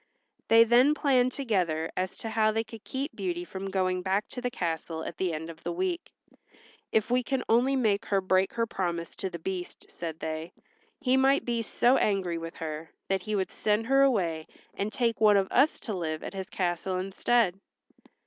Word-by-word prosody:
They 225 0 +8
then 245 +6 +5
planned 255 -4 +3
together 180 - -1
as 185 +1 -2
to 225 - -5
how 215 -1 +3
they 225 +1 0
could 225 -1 -12
keep 275 +3 -4
Beauty 350 -1 -3
from 195 - -6
going 185 -1 0
back 195 +3 0
to 250 - -6
the 250 - -1
castle 165 -5 -3
at - - -6
the 185 0 0
end 160 0 -4
of 160 - -15
the - - -3
week. 355 0 -2 0.8
"If 220 +2 +1
we 250 +1 +4
can 265 +1 -2
only 250 +4 +3
make 220 -4 +1
her 195 - +2
break 190 0 +2
her 230 -1 +1
promise 175 -6 -3
to 190 - -3
the 170 - -6
Beast," 180 +1 -6
said 165 -2 -6
they, 160 +1 -4 0.5
"he 260 -2 +3
might 270 +1 +3
be 235 -1 0
so 240 +3 +3
angry 185 -5 0
with 165 0 -7
her 160 0 -5 0.2
that 190 -1 +1
he 215 +2 -2
would 190 -2 -1
send 215 +1 0
her 270 +3 +4
away 175 -12 +2 0.3
and 200 +2 -3
take 230 0 0
one 210 -2 +6
of 195 -1 +2
us 280 +5 +3
to 220 - -4
live 160 -4 -3
at - - -6
his 190 -1 -5
castle 185 0 -1
instead." 195 +1 +1
200 Hz, 200 wpm, -28 LUFS, 180-245 Hz, 0.8 s, They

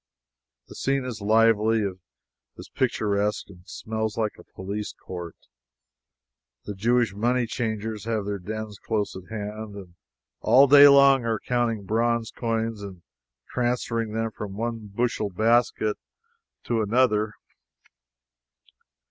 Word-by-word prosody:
The - - -12
scene 135 -1 -1
is 115 -4 -6
lively, 110 0 +3 0.7
is - - -11
picturesque, 105 -5 -1
and 90 - -15
smells 110 -1 -4
like 110 -2 0
a - - -12
police 100 +2 -5
court. 85 -2 -7 1.3
The 105 - -5
Jewish 115 +2 +1
money 120 +4 +1
changers 110 -2 -4
have 110 -3 -1
their 100 -1 -3
dens 110 +2 -6
close 105 -2 -2
at 95 -1 -10
hand, 105 -1 -6
and 95 -4 -10 0.5
all 135 +2 +6
day 145 +1 +9
long 140 -2 +6
are 115 -1 0
counting 120 -3 -1
bronze 115 +2 0
coins 115 -2 -2
and 95 -4 -9 0.5
transferring 120 -2 -1
them 115 0 -1
from 100 -2 -7
one 115 -1 -4
bushel 110 0 -1
basket 110 +1 +1 0.7
to 115 -2 0
another. 110 -1 +2
110 Hz, 120 wpm, -25 LUFS, 105-120 Hz, 1.3 s, day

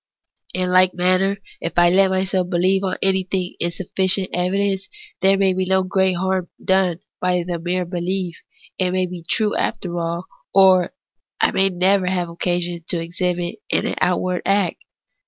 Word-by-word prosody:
In 180 0 -1
like 185 0 +4
manner, 185 +2 +2 0.2
if 165 - -4
I 175 0 +5
let 190 +1 +4
myself 185 -1 0
believe 185 +2 +2 0.2
anything 190 -1 0
on - - -22
insufficient 185 +2 +1
evidence, 190 +2 0 0.3
there 195 +1 +4
may 195 -1 +3
be 185 0 -1
no 190 0 +3
great 190 0 +1
harm 185 0 -1 0.2
done 190 -2 +2 0.2
by 180 -1 +1
the 175 -1 -3
mere 180 +2 -1
belief; 180 0 -3 0.4
it 185 -1 +2
may 185 0 0
be 180 -1 -7
true 210 +6 0
after 175 -2 -2
all, 170 +1 -3 0.3
or 190 -1 +5 0.4
I - - +3
may 195 0 +2
never 185 +1 +2
have 180 -2 -1
occasion 175 0 -2
to 175 - 0
exhibit 175 +1 -2
it - - +1
in - - -1
outward 180 0 +1
acts. 195 -3 0
185 Hz, 160 wpm, -21 LUFS, 175-190 Hz, 0.4 s, I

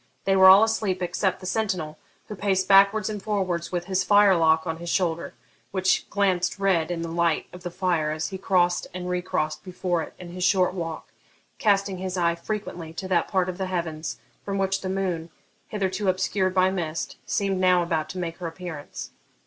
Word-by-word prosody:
They 195 - +3
were 190 0 +7
all 190 +3 +9
asleep 220 -4 0
except 180 +2 -1
the - - -8
sentinel, 185 -7 -2 0.3
who - - -6
paced 190 -1 0
backwards 200 +1 +5
and 210 -2 -4
forwards 190 -5 -2
with 175 -1 -2
his 190 0 0
firelock 175 -6 +4
on 160 -1 -3
his 170 +1 -6
shoulder, 170 -2 -1 0.3
which 190 -1 +1
glanced 190 -3 +1
red 185 -5 +1
in 170 -1 -3
the - - -3
light 170 -1 +1
of 180 - -10
the 175 - -4
fire 170 -3 0
as 155 +1 -2
he 190 - -6
crossed 180 -2 +1
and 180 0 -5
re 180 0 -1
crossed 155 -4 -2
before 180 -2 -2
it - - -8
in 180 - -10
his 180 +1 -5
short 185 -1 +3
walk, 165 -3 -5 0.5
casting 200 -3 +1
his 185 0 -4
eye 170 -1 +2
frequently 170 -3 -5
to 185 +3 -5
that 175 -3 +2
part 185 -2 +1
of 185 0 -5
the 190 - -1
heavens 165 -3 -3 0.3
from 195 -1 -3
which 195 0 0
the 185 - -4
moon, 185 -4 -2 0.4
hitherto 195 -1 -2
obscured 185 0 0
by 185 0 +4
mist, 165 -4 -4
seemed 195 -2 0
now 180 -1 +4
about 165 -2 -1
to 185 - -7
make 170 -2 -4
her 175 - -5
appearance. 165 -3 -7
185 Hz, 195 wpm, -25 LUFS, 170-195 Hz, 0.5 s, all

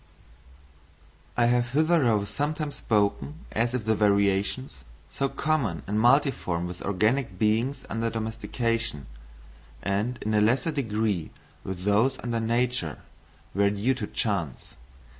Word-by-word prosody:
I 120 - +4
have 120 0 +2
hitherto 145 -9 +3
sometimes 150 +4 -2
spoken 110 +8 0
as 115 +2 0
if 115 -4 -3
the 110 - +3
variations—so 100 - 0
common 135 - -1
and 105 +2 -1
multiform 120 - +2
with 90 0 -7
organic 110 +2 0
beings 110 +7 +1
under 115 0 -1
domestication, 115 - -2 0.8
and 105 +5 -1
in 110 - -1
a 105 - +4
lesser 125 +10 +2
degree 110 - -1 0.3
with 95 -1 -5
those 110 +7 +3
under 120 -1 -1
nature—were 115 - -2
due 105 +6 +1
to - - -4
chance. - - -3
115 Hz, 115 wpm, -27 LUFS, 100-130 Hz, 0.8 s, I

